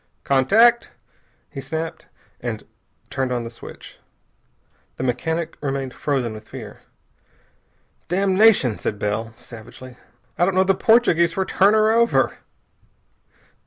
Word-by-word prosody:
"Contact!" 220 Hz, -, +4 dB, 0.6 s
he 135 Hz, -, -6 dB
snapped, 160 Hz, +5 st, -5 dB, 0.3 s
and -, -, -5 dB, 0.5 s
turned 130 Hz, -1 st, -2 dB
on 120 Hz, -1 st, -1 dB
the 115 Hz, -, -7 dB
switch. 115 Hz, -, -12 dB, 1.0 s
The -, -, -4 dB
mechanic 160 Hz, +7 st, -2 dB
remained 135 Hz, -2 st, -3 dB
frozen 130 Hz, -6 st, -2 dB
with 110 Hz, 0 st, -11 dB
fear. -, -, -9 dB, 1.3 s
"Damnation!" 190 Hz, -, +3 dB
said 105 Hz, -, -3 dB
Bell 110 Hz, +2 st, -3 dB
savagely. 125 Hz, +2 st, -12 dB, 0.4 s
"I 175 Hz, -, +5 dB
don't 190 Hz, 0 st, 0 dB
know 190 Hz, -, +5 dB
the 195 Hz, 0 st, +3 dB
Portuguese 190 Hz, -5 st, +3 dB
for 190 Hz, -, -1 dB
'Turn 200 Hz, +3 st, +3 dB
her 215 Hz, 0 st, +4 dB
over'!" 235 Hz, +1 st, +2 dB
155 Hz, 120 wpm, -22 LUFS, 125-195 Hz, 1.3 s, I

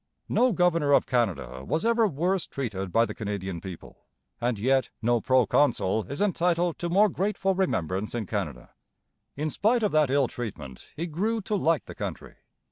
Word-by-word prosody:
No 250 Hz, 0 st, +3 dB
governor 170 Hz, -6 st, +2 dB
of -, -, +5 dB
Canada 100 Hz, -, -1 dB
was 160 Hz, -, -1 dB
ever 230 Hz, -1 st, +3 dB
worse 180 Hz, +3 st, -1 dB
treated 100 Hz, -9 st, -4 dB
by 115 Hz, +4 st, +4 dB
the -, -, -6 dB
Canadian 95 Hz, -5 st, -4 dB
people; 90 Hz, -3 st, -10 dB, 0.3 s
and 120 Hz, -1 st, 0 dB
yet 130 Hz, +4 st, +2 dB
no 120 Hz, 0 st, +1 dB
proconsul 125 Hz, -5 st, +2 dB
is 140 Hz, -, -4 dB
entitled 175 Hz, -3 st, +1 dB
to 175 Hz, -, -2 dB
more 200 Hz, +5 st, +5 dB
grateful 195 Hz, 0 st, 0 dB
remembrance 105 Hz, -, -1 dB
in 115 Hz, -3 st, -2 dB
Canada. 85 Hz, -, -4 dB, 0.6 s
In 150 Hz, +2 st, -2 dB
spite 225 Hz, -, +2 dB
of 210 Hz, -, +2 dB
that 155 Hz, -3 st, +3 dB
ill 140 Hz, -1 st, +3 dB
treatment 75 Hz, -, -7 dB
he 165 Hz, -, -3 dB
grew 200 Hz, +8 st, -1 dB
to 210 Hz, +2 st, -2 dB
like 165 Hz, -5 st, +1 dB
the -, -, -9 dB
country. -, -, -7 dB
140 Hz, 170 wpm, -27 LUFS, 105-180 Hz, 0.6 s, of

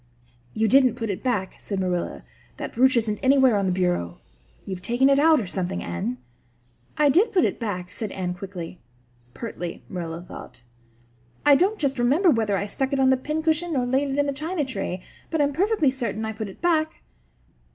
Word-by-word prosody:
"You 220 Hz, 0 st, +2 dB
didn't 255 Hz, +1 st, +5 dB
put 225 Hz, -3 st, -3 dB
it 190 Hz, -, -5 dB
back," 205 Hz, -8 st, -1 dB
said 200 Hz, -2 st, -4 dB
Marilla. 180 Hz, -2 st, -2 dB, 0.3 s
"That -, -, -6 dB
brooch 255 Hz, +1 st, +4 dB
isn't 215 Hz, -2 st, 0 dB
anywhere 265 Hz, -3 st, +5 dB
on 200 Hz, -1 st, +1 dB
the -, -, +1 dB
bureau. 180 Hz, -, -1 dB, 0.5 s
You've 190 Hz, -2 st, -5 dB
taken 240 Hz, +7 st, +3 dB
it 275 Hz, -, +4 dB
out 315 Hz, 0 st, +5 dB
or 220 Hz, -, -3 dB
something, 175 Hz, -, -3 dB
Anne." 85 Hz, +9 st, -3 dB, 0.8 s
"I 295 Hz, -1 st, +4 dB
did 375 Hz, -, +4 dB
put 365 Hz, -, +3 dB
it -, -, -2 dB
back," 185 Hz, -6 st, -4 dB
said 215 Hz, -3 st, -5 dB
Anne 180 Hz, -2 st, -3 dB
quickly 180 Hz, -2 st, -8 dB, 0.6 s
pertly, 175 Hz, -7 st, -6 dB
Marilla 170 Hz, -2 st, -5 dB
thought. 125 Hz, -8 st, -11 dB, 0.8 s
"I 290 Hz, -, +7 dB
don't 380 Hz, +9 st, +3 dB
just 275 Hz, -5 st, -1 dB
remember 295 Hz, +10 st, +4 dB
whether 220 Hz, -5 st, +1 dB
I 200 Hz, -, -2 dB
stuck 265 Hz, +7 st, -2 dB
it 275 Hz, -, +1 dB
on 265 Hz, 0 st, +5 dB
the -, -, +5 dB
pincushion 315 Hz, +4 st, -1 dB
or 250 Hz, -2 st, +1 dB
laid 265 Hz, +3 st, +1 dB
it 270 Hz, -, -2 dB
in 285 Hz, -, +3 dB
the 280 Hz, -, -1 dB
china 310 Hz, +2 st, -2 dB
tray. 185 Hz, -8 st, -4 dB, 0.3 s
But 320 Hz, -, -1 dB
I'm 290 Hz, 0 st, +2 dB
perfectly 375 Hz, -4 st, +2 dB
certain 235 Hz, -4 st, -3 dB
I 220 Hz, -, -3 dB
put 215 Hz, -1 st, -5 dB
it 190 Hz, -, -14 dB
back." 320 Hz, -2 st, +1 dB
240 Hz, 195 wpm, -24 LUFS, 190-285 Hz, 0.8 s, I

